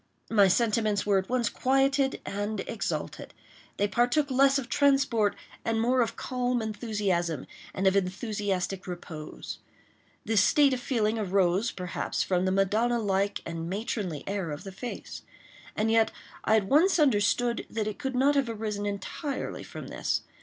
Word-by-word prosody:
My 205 -3 +6
sentiments 215 0 +2
were 200 -2 +3
at 190 - -6
once 245 -2 +1
quieted 270 +3 +1
and 205 +1 -3
exalted. 155 -9 -4 0.4
They 205 - +2
partook 245 +7 +1
less 275 +1 +5
of 265 -4 -3
transport 270 -7 +2 0.3
and 225 -1 0
more 250 +3 +3
of 230 - -1
calm 250 -1 -1
enthusiasm—of 195 - -1
enthusiastic 195 -1 -1
repose. 165 -3 -7 0.7
This 220 -3 +3
state 280 +5 +4
of 255 - -1
feeling 225 -3 0
arose, 195 +1 +2
perhaps, 180 -4 -3
from 180 -1 +1
the 185 - +1
Madonna 210 +5 +2
like 200 -2 0
and 165 0 -4
matronly 195 - -3
air 195 -4 -2
of 150 0 -6
the 195 - -7
face; 240 +6 -7 0.5
and 220 +1 +1
yet 225 -1 +4 0.3
I 220 - +4
at 220 - +3
once 320 - +4
understood 240 -3 +2
that 220 -2 -2
it 215 +4 -4
could 265 -3 -3
not 275 +3 +4
have 275 -4 +1
arisen 210 -2 -3
entirely 205 +8 -4
from - - -8
this. - - -1
215 Hz, 150 wpm, -28 LUFS, 195-245 Hz, 0.7 s, My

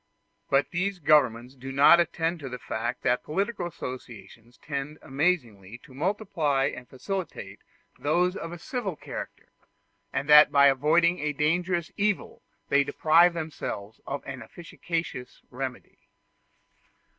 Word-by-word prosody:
But 135 +1 +2
these 185 +2 -1
governments 130 -6 +2
do 135 0 -8
not 140 +5 +7
attend 170 0 0
to 135 -3 -7
the 125 - -5
fact 115 0 -4
that 125 -1 +2
political 195 +3 -2
associations 120 - -9
tend 145 +1 -5
amazingly 125 - -1
to 130 - -16
multiply 155 -5 0
and 125 0 -11
facilitate 185 +6 -5 0.4
those 180 +5 +1
of 165 - -6
a 175 - -7
civil 200 0 -4
character, - - -8 0.6
and 140 - -2
that 150 0 +9
in 145 - -14
avoiding 150 +6 +4
a 150 0 -1
dangerous 170 +3 0
evil 205 -1 -1 0.3
they 140 0 +4
deprive 170 +4 +4
themselves 115 -10 -6
of 140 0 -4
an 135 -2 -7
efficacious 165 -1 -6
remedy. 130 0 -6
150 Hz, 130 wpm, -27 LUFS, 130-175 Hz, 0.6 s, that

